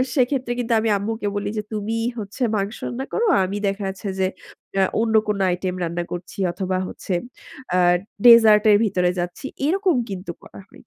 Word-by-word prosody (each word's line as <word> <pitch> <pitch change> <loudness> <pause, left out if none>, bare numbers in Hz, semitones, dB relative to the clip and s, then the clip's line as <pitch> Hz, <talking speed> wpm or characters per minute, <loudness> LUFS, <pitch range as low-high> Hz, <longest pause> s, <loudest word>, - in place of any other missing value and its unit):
সেক্ষেত্রে 255 -1 +1
কিন্তু 235 -1 0
আমি 220 0 0
আম্মুকে 210 +1 -3
বলি 205 0 -2
যে 210 - -1
তুমি 215 +2 -2 0.2
হচ্ছে 205 +3 -8
মাংস 200 +2 -2
রান্না 255 +2 -4
করো। 465 - +1 0.2
আমি 200 +2 -4
দেখা 195 +1 -2
যাচ্ছে 190 +1 -6
যে 185 - +3 0.5
আ - - +5 0.2
অন্য 225 -1 0
কোন 210 -1 0
আইটেম 180 +1 -2
রান্না 170 +1 -2
করছি 175 +3 -7
অথবা 185 0 -2
হচ্ছে 185 - -5 0.6
আ - - +3 0.5
ডেজার্ট 225 -3 +8
এর 205 - +7
ভিতরে 180 -3 +1
যাচ্ছি। 175 +10 -4 0.2
এরকম 375 -2 +2
কিন্তু 185 -2 -5
করা - - -13
হয়। - - -18
205 Hz, 175 wpm, -22 LUFS, 190-230 Hz, 0.6 s, ডেজার্ট